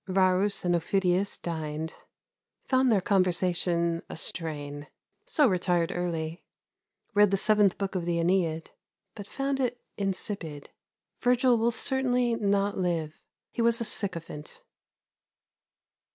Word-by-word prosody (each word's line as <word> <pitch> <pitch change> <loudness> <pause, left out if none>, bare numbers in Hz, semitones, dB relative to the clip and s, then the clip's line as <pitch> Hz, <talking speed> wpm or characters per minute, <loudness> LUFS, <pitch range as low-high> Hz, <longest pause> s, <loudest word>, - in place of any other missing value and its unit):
Varus 190 +1 +2
and 175 - +2
Aufidius 185 +3 +1
dined. 160 -1 -4 0.7
Found 260 -1 +3
their 205 -4 +3
conversation 175 -3 +1
a - - -7
strain. 145 -3 -4 0.4
So 320 -12 +3
retired 175 -4 +1
early. 170 -1 -3 0.7
Read 205 0 +5
the 195 - +1
Seventh 210 -1 +3
Book 195 -1 -3
of 180 -3 -2
the 170 -1 0
"Æneid," 170 -2 0 0.4
but 205 -2 -9
found 275 +2 -2
it 245 -2 -1 0.2
insipid. 185 -6 -4 0.5
Virgil 250 0 +3
will 230 +1 +2
certainly 250 -1 +2
not 200 -2 0
live. 165 -4 -2 0.3
He - - -3
was 230 0 +3
a 230 - -2
sycophant. 170 -8 -4
185 Hz, 120 wpm, -28 LUFS, 170-215 Hz, 0.7 s, Read